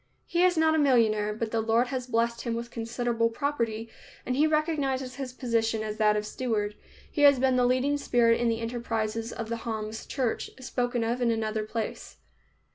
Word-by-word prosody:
He 345 0 0
is 360 -2 +4
not 320 0 +4
a 315 - +2
millionaire, 220 -7 +3
but 220 +1 -3
the 225 - +1
Lord 230 +3 +2
has 255 -1 -3
blessed 235 0 0
him 235 -2 -2
with 235 0 -5
considerable 230 0 -1
property, 230 -4 -2 0.4
and 250 - -1
he 300 +3 +4
recognizes 280 -5 0
his 270 -2 -4
position 230 -3 0
as 215 0 -4
that 210 -1 +4
of 210 - -2
steward. 210 -3 -2 0.4
He 295 - -2
has 285 -2 +7
been 260 0 +2
the 250 -1 +3
leading 260 +3 +2
spirit 240 -4 +3
in 240 - +2
the 225 0 -1
enterprises 230 -1 -2
of 225 - -5
the 230 +1 -3
Homs 220 -1 -5
church, 255 -5 -2
spoken 245 -1 -1
of 235 +2 -1
in 240 - +3
another 220 -1 -1
place. 220 0 -5
235 Hz, 195 wpm, -28 LUFS, 225-255 Hz, 0.4 s, has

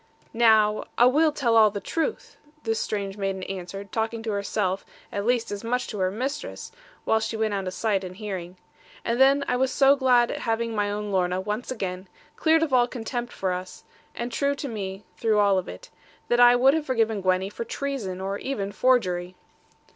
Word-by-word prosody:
'Now, 220 -2 +4
a 240 - +7
will 305 +5 +4
tell 245 -6 +1
all 220 -1 +7
the 205 0 -5
truth,' 330 - -3 0.3
this 225 -1 -1
strange 200 -1 -3
maiden 195 -1 -2
answered, 195 +1 -6
talking 225 0 -2
to 225 - -2
herself 200 -1 -1 0.3
at 200 +2 -3
least 240 -2 +1
as 205 +1 -5
much 250 +2 0
as - - -8
to 210 - -5
her 185 -1 +2
mistress, 270 - -5 0.3
while 220 - +3
she 220 0 -3
went 220 -1 0
out 195 -2 -2
of 185 - -3
sight 205 -4 0
and 185 0 -7
hearing. 185 -4 -6 0.5
And 235 +2 0
then 275 +1 +5
I 250 - +1
was 260 +1 +1
so 275 0 +5
glad 250 -3 +3
at - - -4
having 230 0 -1
my 205 -1 0
own 205 0 -3
Lorna 180 -1 +1
once 210 +5 -4
again, 190 -6 -4 0.3
cleared 320 0 +3
of 300 -5 -2
all 245 -1 +5
contempt 240 0 -4
for 190 -1 -2
us, 185 +1 -7 0.3
and 240 +1 -4
true 280 +3 0
to 280 - -5
me 195 -4 -5
through 220 -2 +1
all 200 -2 +4
of 180 - -7
it, - - -10 0.4
that 240 - +3
I 245 0 +8
would 265 +3 +5
have 315 -1 -1
forgiven 225 -5 +1
Gwenny 185 +1 +1
for 235 - -5
treason, 235 -9 -4
or 195 +1 -3
even 205 -8 -3
forgery. 185 -6 +1
220 Hz, 205 wpm, -25 LUFS, 195-245 Hz, 0.5 s, I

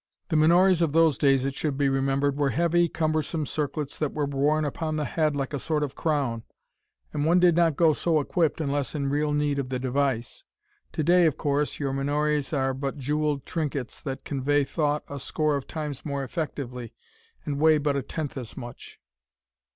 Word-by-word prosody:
The 165 - 0
menores 175 +3 +5
of 160 -4 +1
those 165 -2 +4
days, 135 -1 +3
it 135 - -1
should 140 -1 -2
be 140 -1 +2
remembered, 135 +1 +1
were 145 -1 +1
heavy, 170 +5 +2
cumbersome 155 0 -1
circlets 145 0 -3
that 150 -2 -1
were 150 -1 0
worn 145 +2 +1
upon 155 +2 -3
the 150 -1 -1
head 155 -1 0
like 140 0 -3
a 140 - -1
sort 150 +2 -1
of 140 -2 -3
crown, 140 -8 -1 0.7
and 145 - -1
one 170 +4 +4
did 175 -2 +5
not 165 -3 +3
go 160 0 +4
so 160 0 +1
equipped 160 +2 0
unless 145 -1 -2
in 140 -2 -1
real 150 +1 +1
need 145 -1 0
of 130 -2 -3
the 130 - -1
device. 130 -2 -1 0.5
To 155 - -1
day, 175 +2 +5
of 155 -1 -1
course, 145 0 0
your 140 -2 -2
menores 145 +1 0
are 135 -3 0
but 135 +2 -4
jeweled 150 +1 -1
trinkets 145 -6 -3
that 135 -2 -5
convey 145 +1 +1
thought 150 +1 -1
a 140 - -6
score 150 +3 0
of 140 - -4
times 150 -4 -5
more 140 -2 -3
effectively, 130 -5 -5 0.5
and 140 -2 -2
weigh 155 0 +5
but 145 -1 0
a 140 - 0
tenth 150 +2 -5
as 120 -4 -7
much. 120 0 -9
145 Hz, 195 wpm, -26 LUFS, 135-155 Hz, 0.7 s, menores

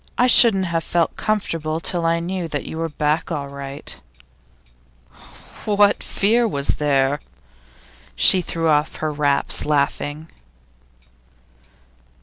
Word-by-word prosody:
'I 250 - +4
shouldn't 225 -6 +6
have 165 -2 -2
felt 170 0 0
comfortable 165 -7 -2
till 170 0 0
I 165 0 +1
knew 175 0 -4
that 145 -3 -4
you 160 - -6
were 165 0 -2
back 150 +3 -1
all 145 -4 -4
right.' 140 0 -7 1.6
'What 205 -1 +3
fear 230 +4 +1
was 140 -9 -2
there?' 140 -1 +1 1.0
She 185 - +5
threw 165 -1 -3
off 150 0 +1
her 155 -1 -3
wraps, 145 -1 0
laughing. 145 +1 -2
160 Hz, 120 wpm, -21 LUFS, 145-185 Hz, 1.6 s, shouldn't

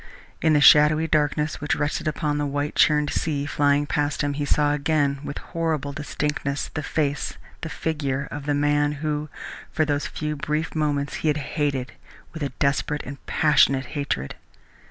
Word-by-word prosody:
In 160 -1 +4
the 145 - +4
shadowy 150 +2 +7
darkness 150 -1 0
which 145 - 0
rested 145 +1 -2
upon 150 -1 -1
the 145 - 0
white 145 +1 -2
churned 150 -1 +3
sea 145 -3 -1
flying 145 0 +2
past 145 0 -1
him, 145 0 0
he 145 0 -2
saw 145 0 +2
again, 145 -2 +1
with 145 - -5 0.2
horrible 160 -4 -1
distinctness, 145 -1 -3
the 160 - -2
face, 145 -1 -2 0.2
the 160 - -4
figure 145 -3 -2
of 145 0 -6
the 145 - +2
man 145 0 +2
who 150 0 -2 0.4
for 155 - +1
those 145 -1 -1
few 150 0 -3
brief 150 +2 -2
minutes 145 -2 -1
he - - -2
had 150 -1 +2
hated 140 -3 -2 0.4
with 160 - -7
a 140 - -1
desperate 140 +2 -1
and 140 +1 -9
passionate 140 -3 +3
hatred. 140 - -2
145 Hz, 170 wpm, -24 LUFS, 145-150 Hz, 0.4 s, shadowy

